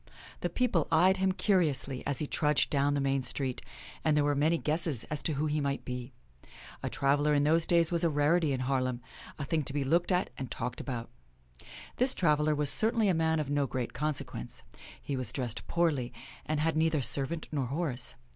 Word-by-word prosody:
The -, -, -2 dB
people 225 Hz, -, +1 dB
eyed 185 Hz, +4 st, +5 dB
him 190 Hz, 0 st, +2 dB
curiously 165 Hz, -9 st, +1 dB
as 140 Hz, -2 st, -1 dB
he 150 Hz, -, -1 dB
trudged 150 Hz, 0 st, +1 dB
down 145 Hz, 0 st, +2 dB
the -, -, +1 dB
main 135 Hz, 0 st, +1 dB
street, 130 Hz, 0 st, -2 dB, 0.4 s
and 155 Hz, -1 st, +3 dB
there 150 Hz, -, +3 dB
were 145 Hz, 0 st, +2 dB
many 155 Hz, +4 st, +2 dB
guesses 155 Hz, -6 st, 0 dB
as 150 Hz, -, -1 dB
to 160 Hz, -, 0 dB
who 145 Hz, +2 st, -1 dB
he 150 Hz, 0 st, 0 dB
might 140 Hz, -1 st, -2 dB
be. 125 Hz, 0 st, -5 dB, 0.7 s
A -, -, -2 dB
traveler 145 Hz, +2 st, +2 dB
in 145 Hz, -, +3 dB
those 160 Hz, +2 st, +2 dB
days 170 Hz, -1 st, +3 dB
was 170 Hz, 0 st, +1 dB
a 170 Hz, -, +4 dB
rarity 150 Hz, +2 st, +2 dB
in 130 Hz, -1 st, -1 dB
Haar 130 Hz, 0 st, +1 dB
lem 125 Hz, -1 st, -2 dB, 0.2 s
— -, -, -15 dB
a 145 Hz, -, -4 dB
thing 160 Hz, +2 st, 0 dB
to 135 Hz, -, -5 dB
be 145 Hz, -1 st, 0 dB
looked 170 Hz, +7 st, +1 dB
at 180 Hz, +1 st, +1 dB
and 130 Hz, -2 st, -4 dB
talked 125 Hz, +2 st, -4 dB
about. 120 Hz, -4 st, -5 dB, 0.9 s
This 255 Hz, +1 st, +2 dB
traveler 150 Hz, -2 st, +2 dB
was 145 Hz, -1 st, +2 dB
certainly 225 Hz, -1 st, +3 dB
a -, -, +3 dB
man 160 Hz, -1 st, +1 dB
of 145 Hz, -2 st, -3 dB
no 145 Hz, -1 st, +1 dB
great 125 Hz, -2 st, -3 dB
consequence. 150 Hz, -, -4 dB, 0.4 s
He 140 Hz, -, -4 dB
was 125 Hz, -4 st, -3 dB
dressed 125 Hz, -3 st, -4 dB
poorly, 150 Hz, -8 st, 0 dB, 0.4 s
and 155 Hz, -1 st, 0 dB
had 160 Hz, +1 st, +1 dB
neither 160 Hz, -3 st, +2 dB
servant 145 Hz, +6 st, -2 dB
nor 140 Hz, -4 st, -1 dB
horse. 140 Hz, -2 st, -2 dB
150 Hz, 210 wpm, -30 LUFS, 135-165 Hz, 0.9 s, eyed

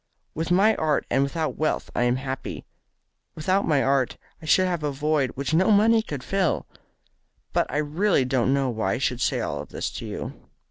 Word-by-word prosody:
With 160 Hz, +2 st, -3 dB
my 200 Hz, +5 st, +4 dB
art 155 Hz, -2 st, +1 dB
and 135 Hz, -, +3 dB
without 155 Hz, +3 st, -1 dB
wealth 155 Hz, -, -1 dB
I 120 Hz, -, +2 dB
am 120 Hz, 0 st, +2 dB
happy. 135 Hz, 0 st, -5 dB, 0.7 s
Without 185 Hz, +5 st, +1 dB
my 145 Hz, -4 st, +3 dB
art 135 Hz, -2 st, +1 dB, 0.2 s
I 155 Hz, -, -9 dB
should 185 Hz, +4 st, +5 dB
have 175 Hz, -3 st, -1 dB
a 150 Hz, -1 st, -1 dB
void 145 Hz, -1 st, 0 dB
which 140 Hz, +3 st, -3 dB
no 185 Hz, +6 st, +4 dB
money 220 Hz, +2 st, +5 dB
could 145 Hz, -, -6 dB
fill. 190 Hz, +2 st, 0 dB, 0.9 s
But -, -, +2 dB
I -, -, -2 dB
really 150 Hz, +1 st, +1 dB
don't 130 Hz, -1 st, +1 dB
know 135 Hz, -2 st, +1 dB
why 110 Hz, -4 st, -1 dB
I -, -, -1 dB
should 125 Hz, -1 st, -1 dB
say -, -, +1 dB
all -, -, -3 dB
this -, -, -5 dB
to -, -, -6 dB
you." -, -, -7 dB
150 Hz, 195 wpm, -25 LUFS, 135-180 Hz, 0.9 s, should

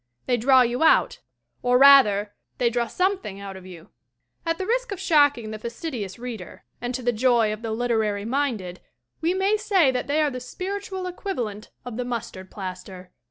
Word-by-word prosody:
They 250 Hz, -, +2 dB
draw 255 Hz, +2 st, +5 dB
you 245 Hz, +2 st, -2 dB
out, 320 Hz, -, +4 dB, 0.4 s
or 245 Hz, 0 st, +3 dB
rather, 215 Hz, -7 st, +6 dB, 0.2 s
they 235 Hz, -1 st, +1 dB
draw 240 Hz, 0 st, 0 dB
something 365 Hz, -, -1 dB
out 200 Hz, -1 st, -7 dB
of 190 Hz, -1 st, -11 dB
you. 170 Hz, -3 st, -12 dB, 0.6 s
At 330 Hz, 0 st, +1 dB
the 375 Hz, -, -3 dB
risk -, -, -1 dB
of 395 Hz, -, -4 dB
shocking 285 Hz, -8 st, +3 dB
the 215 Hz, -, -6 dB
fastidious 235 Hz, -, -5 dB
reader 235 Hz, -6 st, -8 dB, 0.2 s
and 245 Hz, +1 st, -3 dB
to 255 Hz, -, -5 dB
the 245 Hz, 0 st, +1 dB
joy 230 Hz, -2 st, +2 dB
of 215 Hz, -, -8 dB
the 230 Hz, -, -4 dB
literally 220 Hz, -3 st, -1 dB
minded 230 Hz, -9 st, -2 dB, 0.4 s
we 340 Hz, +3 st, +1 dB
may 390 Hz, +3 st, +2 dB
say 390 Hz, -9 st, +3 dB
that 250 Hz, -1 st, -3 dB
they 290 Hz, +2 st, +1 dB
are 300 Hz, -2 st, +2 dB
the 255 Hz, -, -5 dB
spiritual 380 Hz, +8 st, -5 dB
equiva -, -, -4 dB
EDITH 360 Hz, -1 st, -6 dB
WHARTON 395 Hz, -2 st, -4 dB
5 -, -, -12 dB
lent 210 Hz, 0 st, -7 dB, 0.2 s
of 245 Hz, -2 st, -6 dB
the 250 Hz, -, -2 dB
mustard 230 Hz, -6 st, -5 dB
plaster. 185 Hz, -1 st, -8 dB
245 Hz, 205 wpm, -24 LUFS, 215-305 Hz, 0.6 s, rather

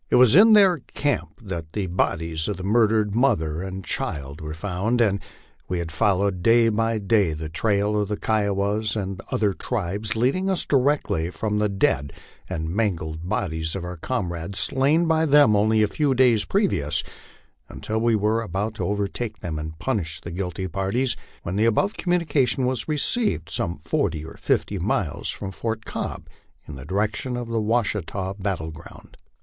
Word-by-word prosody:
It -, -, +3 dB
was 125 Hz, 0 st, +6 dB
in 220 Hz, +4 st, +8 dB
their 195 Hz, -6 st, +6 dB
camp 110 Hz, -, -3 dB
that 85 Hz, -5 st, -6 dB
the 105 Hz, -2 st, -1 dB
bodies 80 Hz, -3 st, -1 dB
of 105 Hz, -, -2 dB
the 95 Hz, -, -7 dB
murdered 110 Hz, 0 st, +2 dB
mother 80 Hz, -, +1 dB
and 95 Hz, 0 st, -6 dB
child 70 Hz, +1 st, -4 dB
were 75 Hz, 0 st, -5 dB
found, 100 Hz, +7 st, -1 dB
and 100 Hz, -4 st, +2 dB, 0.5 s
we 90 Hz, -, -2 dB
had 85 Hz, -1 st, -4 dB
followed 95 Hz, +2 st, +1 dB
day 115 Hz, +3 st, +5 dB
by 115 Hz, +1 st, 0 dB
day 100 Hz, -4 st, +2 dB
the 75 Hz, 0 st, -5 dB
trail 105 Hz, +4 st, +1 dB
of 105 Hz, -, -1 dB
the 105 Hz, -, -2 dB
Kiowas 105 Hz, 0 st, 0 dB
and 100 Hz, -2 st, -4 dB
other 105 Hz, -2 st, +1 dB
tribes, 105 Hz, 0 st, -3 dB
leading 135 Hz, +12 st, +1 dB
us 190 Hz, -, +1 dB
directly 135 Hz, -, +1 dB
from 105 Hz, +3 st, -2 dB
the 105 Hz, 0 st, +1 dB
dead 70 Hz, -8 st, 0 dB, 0.4 s
and 80 Hz, 0 st, -3 dB
mangled 85 Hz, -5 st, -2 dB
bodies 80 Hz, -3 st, -2 dB
of 95 Hz, -, -4 dB
our 90 Hz, 0 st, -5 dB
comrades, 90 Hz, -3 st, -3 dB
slain 145 Hz, +6 st, +4 dB
by 160 Hz, -1 st, +2 dB
them 145 Hz, -7 st, +6 dB
a 110 Hz, +1 st, +3 dB
few 140 Hz, +5 st, 0 dB
days 120 Hz, -4 st, +4 dB
pre 200 Hz, +1 st, +2 dB
vious, 75 Hz, -, 0 dB, 0.7 s
until 110 Hz, +1 st, -3 dB
we 115 Hz, -1 st, +3 dB
were 110 Hz, +2 st, +1 dB
about 105 Hz, +1 st, -3 dB
to -, -, -4 dB
overtake 105 Hz, +2 st, -2 dB
and 80 Hz, -1 st, -5 dB
punish 90 Hz, -7 st, -2 dB
the 85 Hz, -, -8 dB
guilty 90 Hz, +1 st, -3 dB
parties, 100 Hz, +8 st, -1 dB, 0.3 s
when 90 Hz, +3 st, -3 dB
the 110 Hz, -, +3 dB
above 115 Hz, -, +2 dB
communication 150 Hz, -7 st, +1 dB
was 125 Hz, -3 st, -1 dB
received, 155 Hz, -, 0 dB
some 85 Hz, -, -2 dB
forty 80 Hz, 0 st, -1 dB
or 80 Hz, -, -9 dB
fifty -, -, -1 dB
miles -, -, -1 dB
from 95 Hz, -, -5 dB
Fort 110 Hz, +2 st, -4 dB
Cobb, -, -, -5 dB, 0.4 s
in 75 Hz, -, -8 dB
the 65 Hz, -1 st, -9 dB
direction 105 Hz, -, -1 dB
of 120 Hz, -1 st, -5 dB
the 115 Hz, -1 st, 0 dB
Washita 105 Hz, -4 st, -1 dB
battle 90 Hz, -5 st, -2 dB
ground. 80 Hz, +2 st, -13 dB
105 Hz, 170 wpm, -24 LUFS, 85-115 Hz, 0.7 s, in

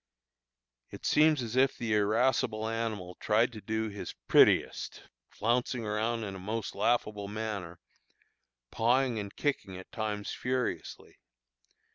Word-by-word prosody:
It -, -, -10 dB
seems 150 Hz, -3 st, +4 dB
as 115 Hz, 0 st, -5 dB
if 130 Hz, +1 st, +3 dB
the 115 Hz, -2 st, -1 dB
irascible 110 Hz, +1 st, +2 dB
animal 110 Hz, -5 st, -3 dB
tried 110 Hz, +3 st, +2 dB
to 110 Hz, -, -8 dB
do 110 Hz, +1 st, -1 dB
his 105 Hz, -1 st, -7 dB
prettiest, -, -, +4 dB, 0.3 s
flouncing 120 Hz, +1 st, 0 dB
around 110 Hz, +2 st, -1 dB
in 100 Hz, -2 st, -5 dB
a 95 Hz, -, -7 dB
most 105 Hz, +3 st, -3 dB
laughable 105 Hz, -4 st, 0 dB
manner, 100 Hz, -5 st, -4 dB, 0.9 s
pawing 120 Hz, 0 st, +2 dB
and 100 Hz, -1 st, -6 dB
kicking 120 Hz, -10 st, -2 dB
at 95 Hz, -, -11 dB
times 105 Hz, -2 st, -3 dB
furiously. 125 Hz, 0 st, -3 dB
110 Hz, 125 wpm, -30 LUFS, 105-120 Hz, 0.9 s, seems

